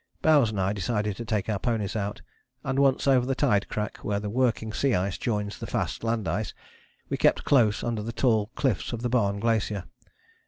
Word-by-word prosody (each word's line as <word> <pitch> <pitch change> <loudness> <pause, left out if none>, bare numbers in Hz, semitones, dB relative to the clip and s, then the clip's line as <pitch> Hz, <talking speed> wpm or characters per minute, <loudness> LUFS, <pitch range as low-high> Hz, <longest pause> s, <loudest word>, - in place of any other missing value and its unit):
Bowers 145 -7 +5
and 105 -2 -3
I 95 +2 +1
decided 105 0 -1
to 120 - -5
take 105 -4 -1
our 105 -3 -1
ponies 110 -3 -1
out, 105 -1 -3 0.4
and 135 -1 -1
once 135 -2 +3
over 130 -2 +5
the 135 +1 -1
tide 105 -9 +2
crack, 105 -1 -3
where 100 -1 -2
the 105 0 -4
working 115 -2 0
sea 135 -2 +2
ice 95 +1 0
joins 105 -5 -2
the - - -5
fast - - -2
land 115 -3 -1
ice, 100 +6 -2 0.5
we - - -1
kept - - +3
close 115 -7 +3
under 115 -2 -1
the 115 +2 -4
tall 110 -3 +2
cliffs 125 -4 0
of 120 0 -4
the 120 - 0
Barne 100 -5 +1
Glacier. 110 -3 0
110 Hz, 205 wpm, -27 LUFS, 105-120 Hz, 0.5 s, Bowers